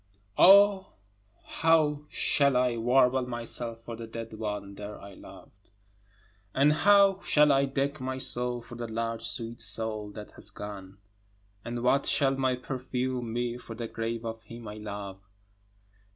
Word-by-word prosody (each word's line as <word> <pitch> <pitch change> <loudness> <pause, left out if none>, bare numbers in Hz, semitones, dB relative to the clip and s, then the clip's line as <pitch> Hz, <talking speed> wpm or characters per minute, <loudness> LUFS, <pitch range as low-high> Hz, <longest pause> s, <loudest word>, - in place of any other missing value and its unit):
10 - - +6
O 200 0 +6 0.5
how 155 -3 +2
shall 140 -3 +2
I 125 -1 +2
warble 125 +2 +2
myself 120 -1 -5
for 115 0 -7
the 115 0 -8
dead 115 0 -7
one 105 -2 -5
there 105 +1 -8
I 100 0 -11
loved? - - -15 0.9
And 145 +3 +4
how 200 +3 +5
shall 150 0 +4
I 140 0 +3
deck 140 +1 -2
my 130 0 -3
soul 125 -2 +1
for - - -12
the 120 0 -5
large 115 0 -3
sweet 115 0 -3
soul 110 0 -2
that 105 -1 -9
has - - -3
gone? 100 -2 -9 0.7
And 120 0 -5
what 135 +2 +2
shall 135 -1 +3
my 130 -1 +1
perfume 125 -1 -4
be 120 0 -2
for 115 - -9
the 115 0 -5
grave 115 +1 -4
of 115 0 -5
him 115 0 -11
I 105 +1 -7
love? 100 -2 -7
120 Hz, 155 wpm, -28 LUFS, 115-135 Hz, 0.9 s, 10